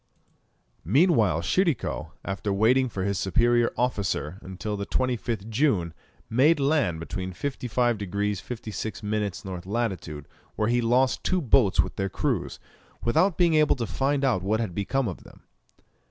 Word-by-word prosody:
Meanwhile 115 Hz, -, +3 dB
Tschirikow, 120 Hz, -, 0 dB, 0.2 s
after 100 Hz, +1 st, -2 dB
waiting 120 Hz, +6 st, +3 dB
for 95 Hz, -4 st, -4 dB
his 100 Hz, -1 st, -1 dB
superior 120 Hz, +5 st, +2 dB
officer 100 Hz, -, -1 dB
until 95 Hz, +3 st, -5 dB
the 100 Hz, 0 st, -5 dB
25th 120 Hz, -4 st, -1 dB
June, 110 Hz, -, +1 dB, 0.3 s
made 145 Hz, +7 st, +4 dB
land 140 Hz, -, +1 dB
between 90 Hz, +3 st, -5 dB
55 120 Hz, 0 st, -1 dB
degrees 100 Hz, 0 st, -2 dB
56 110 Hz, -2 st, -6 dB
minutes 105 Hz, -3 st, -2 dB
N. 90 Hz, -2 st, -5 dB
lat., 105 Hz, -2 st, -2 dB, 0.5 s
where 105 Hz, +1 st, 0 dB
he 120 Hz, 0 st, +2 dB
lost 125 Hz, +3 st, +2 dB
two 185 Hz, -, +1 dB
boats 120 Hz, -, +4 dB
with -, -, -6 dB
their 95 Hz, 0 st, -1 dB
crews, -, -, -2 dB, 0.4 s
without 160 Hz, +10 st, +2 dB
being 175 Hz, -2 st, +4 dB
able 155 Hz, -1 st, +4 dB
to 120 Hz, -3 st, -3 dB
find 135 Hz, +5 st, 0 dB
out 120 Hz, -9 st, +2 dB
what 105 Hz, +3 st, 0 dB
had 110 Hz, -6 st, -2 dB
become 120 Hz, +7 st, -1 dB
of 90 Hz, -, -6 dB
them. -, -, -17 dB
110 Hz, 150 wpm, -26 LUFS, 95-130 Hz, 0.5 s, made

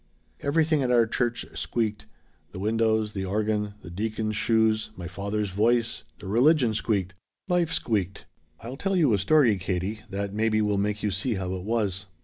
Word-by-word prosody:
"Everything 155 Hz, +1 st, +2 dB
at 130 Hz, -, 0 dB
our 120 Hz, -2 st, +5 dB
church 120 Hz, +1 st, -1 dB
squeaked. 110 Hz, -3 st, -2 dB, 0.5 s
The -, -, -7 dB
windows. 110 Hz, 0 st, +1 dB
The 95 Hz, -, -3 dB
organ. 105 Hz, +1 st, -1 dB
The 85 Hz, -, -9 dB
deacon's 110 Hz, +3 st, -2 dB
shoes. 110 Hz, 0 st, +2 dB
My 90 Hz, -2 st, -7 dB
father's 100 Hz, +3 st, -3 dB
voice. 115 Hz, +4 st, +1 dB
The -, -, -10 dB
religion 125 Hz, +3 st, +4 dB
squeaked. 100 Hz, -4 st, -1 dB, 0.3 s
Life 175 Hz, -3 st, +1 dB
squeaked. 100 Hz, -5 st, -1 dB, 0.4 s
"I'll 120 Hz, +4 st, -7 dB
tell 195 Hz, +4 st, -1 dB
you 155 Hz, -10 st, +4 dB
a 100 Hz, -, +2 dB
story, 120 Hz, +2 st, +4 dB
Katie, 95 Hz, +3 st, -2 dB
that 100 Hz, 0 st, -3 dB
maybe 110 Hz, 0 st, +1 dB
will 105 Hz, -2 st, +1 dB
make 105 Hz, +1 st, -1 dB
you 105 Hz, -, +1 dB
see 105 Hz, +5 st, 0 dB
how 95 Hz, -1 st, -3 dB
it 95 Hz, -, -4 dB
was. 100 Hz, -3 st, -1 dB
110 Hz, 170 wpm, -26 LUFS, 100-115 Hz, 0.5 s, our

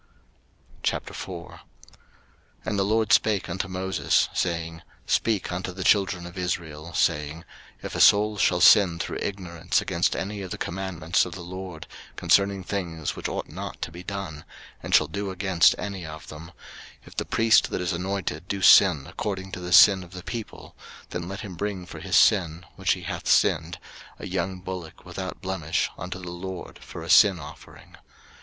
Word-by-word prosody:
03:004:001 85 Hz, -3 st, -4 dB, 1.1 s
And 100 Hz, -, -1 dB
the -, -, +3 dB
LORD 110 Hz, +2 st, +2 dB
spake 105 Hz, -4 st, +3 dB
unto 95 Hz, +2 st, -3 dB
Moses, 95 Hz, 0 st, +1 dB
saying, 85 Hz, -2 st, -2 dB, 0.2 s
03:004:002 -, -, -7 dB
Speak 110 Hz, -6 st, +1 dB
unto 90 Hz, +1 st, -3 dB
the 95 Hz, +1 st, -5 dB
children 95 Hz, -4 st, +2 dB
of 90 Hz, +2 st, -8 dB
Israel, 85 Hz, -3 st, -4 dB
saying, 75 Hz, +2 st, 0 dB, 0.4 s
If -, -, -6 dB
a -, -, 0 dB
soul 105 Hz, +1 st, +5 dB
shall 90 Hz, -1 st, +2 dB
sin 95 Hz, -6 st, +7 dB
through -, -, -4 dB
ignorance 90 Hz, -3 st, -2 dB
against -, -, 0 dB
any 100 Hz, +1 st, -4 dB
of 95 Hz, -, -6 dB
the -, -, -5 dB
commandments 90 Hz, -2 st, -1 dB
of 90 Hz, -, -6 dB
the 95 Hz, -, -8 dB
LORD 90 Hz, -2 st, -8 dB, 0.3 s
concerning 100 Hz, -1 st, +2 dB
things 85 Hz, -6 st, -3 dB
which -, -, -4 dB
ought -, -, -4 dB
not -, -, -7 dB
to -, -, -5 dB
be 85 Hz, +2 st, -9 dB
done, 90 Hz, -6 st, -6 dB, 0.4 s
and -, -, +1 dB
shall 80 Hz, -, +5 dB
do 100 Hz, +6 st, -4 dB
against 95 Hz, -3 st, +3 dB
any 100 Hz, -3 st, -5 dB
of 80 Hz, -1 st, -9 dB
them: 75 Hz, +2 st, -9 dB
03:004:003 85 Hz, -, -13 dB, 0.5 s
If -, -, -14 dB
the -, -, -1 dB
priest 115 Hz, 0 st, +4 dB
that -, -, -3 dB
is 90 Hz, -1 st, -1 dB
anointed 90 Hz, -2 st, -3 dB
do 100 Hz, -1 st, -3 dB
sin 70 Hz, -4 st, +7 dB
according 95 Hz, -2 st, -4 dB
to 90 Hz, -, -6 dB
the 90 Hz, 0 st, -6 dB
sin 95 Hz, +1 st, +7 dB
of 90 Hz, +1 st, -15 dB
the 90 Hz, -1 st, -8 dB
people; 115 Hz, 0 st, -7 dB, 0.4 s
then 85 Hz, -1 st, -4 dB
let 95 Hz, +2 st, -6 dB
him 100 Hz, -5 st, -7 dB
bring 95 Hz, 0 st, -4 dB
for -, -, -10 dB
his -, -, -2 dB
sin, 90 Hz, -5 st, +3 dB
which -, -, +1 dB
he -, -, -8 dB
hath -, -, -5 dB
sinned, 80 Hz, +1 st, +2 dB, 0.4 s
a -, -, -8 dB
young 95 Hz, -1 st, -3 dB
bullock 90 Hz, -2 st, -8 dB
without 95 Hz, +1 st, -6 dB
blemish 85 Hz, -4 st, -1 dB
unto 90 Hz, +2 st, -6 dB
the 90 Hz, -2 st, -7 dB
LORD 90 Hz, +1 st, -7 dB
for 80 Hz, -, -9 dB
a 80 Hz, -, -9 dB
sin 100 Hz, -4 st, +7 dB
offering. 75 Hz, 0 st, -13 dB
90 Hz, 180 wpm, -25 LUFS, 85-95 Hz, 1.1 s, sin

